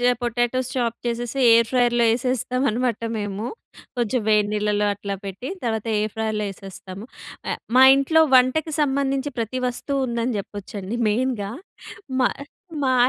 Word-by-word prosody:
చె 245 0 +4
potatoes 240 +1 0
chop 235 -2 0
చేసేసి, 240 +2 -3
air 230 0 +5
ఫ్రైయర్‍లో 240 -2 +3
యేసేస్తాం 250 +1 0
అనమాట 235 0 -1 0.2
మేము. 205 0 -4 0.5
కొంచెం 240 +1 0
వేడి 210 -1 +4
నీళ్లలో 210 0 +1
అట్లా 200 0 -5
పెట్టి. 195 +7 -6
తర్వాత, 225 -2 -2
ఎయిర్ 215 0 -1
ఫ్రైయర్‌లో 220 -1 -1
యేసేస్తాము. 195 +1 -10 0.4
అ - - 0 0.3
మా 260 - +8
ఇంట్లో 295 +4 +3
వంటకు 270 +5 +4
సంబంధించి 275 0 0
ప్రతి 235 +3 -2
వస్తువు 275 +3 -2
ఉందని 235 0 -1
చెప్పొచ్చండి. 200 +1 -6
మెయిన్‍గా 220 -2 -1 0.7
మా 250 - +4 0.5
మా 260 -1 +2
235 Hz, 140 wpm, -23 LUFS, 210-255 Hz, 0.7 s, మా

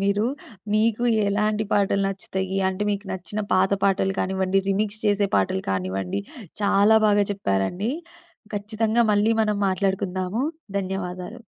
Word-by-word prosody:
మీరు. 200 +2 +2 0.5
మీకు 225 +2 +2 0.2
ఎలాంటి 210 +1 +1
పాటలు 200 -1 +2
నచ్చుతయి, 190 0 -3
అంటే 190 +2 -3
మీకు 200 0 -2
నచ్చిన 190 +3 -4
పాత 185 +1 +3
పాటలు 195 0 +2
కానివ్వండి, 190 0 +1
రీమిక్స్ 205 +2 0
చేసే 205 -1 +3
పాటలు 95 -1 +1
కానివ్వండి. 95 0 -2 0.4
చాలా 205 +2 +5
బాగా 205 -1 +4
చెప్పారండి. 180 - -1 0.6
ఖచ్చితంగా 220 +3 +1
మళ్ళీ 210 +2 +3
మనం 210 -1 0
మాట్లాడుకుందాము. 190 +2 -1 0.4
ధన్యవాదాలు. 185 0 -5
195 Hz, 120 wpm, -24 LUFS, 185-210 Hz, 0.6 s, చాలా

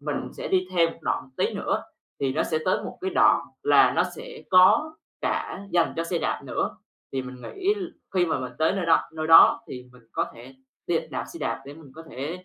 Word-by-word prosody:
mình 145 0 -4
sẽ - - -6
đi 185 -1 +1
thêm 165 -2 +3
một - - -17
đoạn 130 - -2
tí - - 0
nữa - - -1 0.4
thì 135 -1 0
nó 155 - +1
sẽ 155 - -1
tới 185 - +1
một - - -8
cái 380 +1 -2
đoạn - - +4 0.2
là - - +5
nó - - +5
sẽ 475 0 -10
có 210 +12 +5 0.3
cả 200 +1 -3
dành 170 -2 +2
cho 165 - -1
xe 170 +1 -1
đạp - - -2
nữa. - - -2 0.4
Thì 135 -1 -2
mình 125 -1 -10
nghĩ 395 +2 -1
l 395 -3 -5 0.3
khi 180 -2 +3
mà 160 - 0
mình 125 -1 -6
tới 160 0 +3
nơi 190 -3 -2
đo 165 - +3
nơi 155 0 -4
đó 165 +7 +8
thì 125 -1 -8
mình 125 -1 -18
có - - 0
thể 125 +3 -13 0.3
đi 170 -1 +2
đạp 130 - -3
xe - - -10
đạp 115 0 -2
để 140 - -9
mình 150 -4 -15
có 160 - -10
thể, 155 +9 -6
165 Hz, 235 wpm, -25 LUFS, 135-185 Hz, 0.4 s, đó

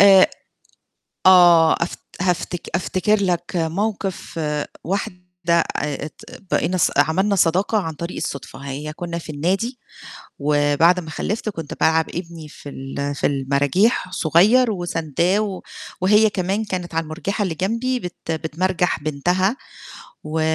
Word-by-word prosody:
آآ 195 -1 +8 1.0
آه، 175 -3 +7
أف 170 - -5 0.3
هافتك 180 -1 -1
أفتكر 190 +4 +1
لك 175 -2 +1
موقِف 190 +1 -2 0.4
واحدة 180 0 -3 0.6
آآ، 145 0 -3
ت 155 - -16 0.3
بقينا 185 - +1
ص 175 - +3
عملنا 185 +8 +3
صداقة 185 +5 +2
عن 165 -6 -2
طريق 170 +4 -6
الصُدفة 135 -1 -5
هي 140 +2 -6
كنّا 170 +1 -5
في 160 -2 -7
النادي، 195 - -1 0.6
وبعد 145 +4 +3
ما 160 -2 -9
خلفت 215 +7 -3
كنت 165 -7 -5
بالعّب 160 0 +3
ابني 170 -3 -7
في 145 - -12
ال 140 +1 -4
في - - 0
المراجيح 140 - +1
صغير 205 - +4
وسانداه، 175 +1 0
و 200 -3 -3 0.4
وهي 210 +3 +5
كمان 195 +3 -1
كانت 180 -5 -4
على 165 - +1
المرجيحة 175 +7 -3
اللي 185 -5 -1
جنبي 230 +9 -1
بت 180 -5 -6
بتمرجح 170 +3 -1
بنتها، 180 - +1 0.7
و 155 +1 -2
175 Hz, 130 wpm, -21 LUFS, 155-195 Hz, 1.0 s, آآ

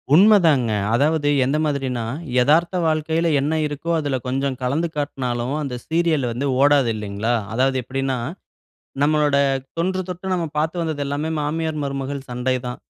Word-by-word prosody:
உண்மதாங்க. 165 - +5 0.2
அதாவது 145 +3 +2 0.2
எந்த 140 +4 +1
மாதிரின்னா, 135 -5 -1 0.4
எதார்த்த 165 +7 +3
வாழ்க்கையில 160 +1 +1
என்ன 145 +3 0
இருக்கோ, 145 +3 -6
அதுல 140 -3 -1
கொஞ்சம் 135 +1 -1
கலந்து 145 +7 0
காட்னாலும், 130 -2 -2
அந்த 135 -4 -4
சீரியலு 160 -5 +1
வந்து 125 +4 -3 0.2
ஓடாது 140 -3 +4
இல்லீங்களா. 105 +2 -2 0.2
அதாவது 130 +2 +2
எப்பிடின்னா 135 +1 -2 0.8
நம்மளோட 150 -1 +3 0.4
தொன்றுதொட்டு, 185 +1 -2
நம்ம 175 -2 0
பார்த்து 160 +3 0
வந்தது 155 -3 -2
எல்லாமே 145 +3 -2
மாமியார், 160 +1 -2
மருமகள் 140 0 -4
சண்டை 125 +1 -1
தான். 125 - -6
145 Hz, 135 wpm, -21 LUFS, 130-160 Hz, 0.8 s, உண்மதாங்க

